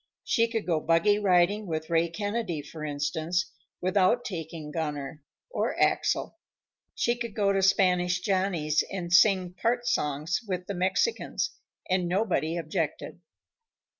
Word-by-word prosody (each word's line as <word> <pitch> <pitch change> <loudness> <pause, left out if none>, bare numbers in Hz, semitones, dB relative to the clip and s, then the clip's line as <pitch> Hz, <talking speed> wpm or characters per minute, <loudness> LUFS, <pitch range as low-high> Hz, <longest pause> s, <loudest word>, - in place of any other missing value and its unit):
She 230 -1 +2
could 225 -2 -3
go 165 -3 +1
buggy 170 +7 +3
riding 200 +1 +3
with 160 -1 -4
Ray 165 0 +3
Kennedy, 205 -4 -3
for 155 +2 -9
instance, 155 +5 -1 0.3
without 190 +6 +2
taking 160 -4 -6
Gunner 150 -2 -4 0.3
or - - -1
Axel. - - +1 0.6
She 235 - +1
could 235 -3 -6
go 200 -2 +2
to 195 - +1
Spanish 185 -2 +3
Johnny's 180 -6 +1
and 175 -3 -4
sing 185 -2 +5
part 240 +6 0
songs 150 - 0
with 180 -2 -3
the 200 - -4
Mexicans, 190 - 0 0.4
and 185 -1 +1
nobody 175 -3 0
objected. 160 -2 -3
180 Hz, 135 wpm, -28 LUFS, 160-200 Hz, 0.6 s, sing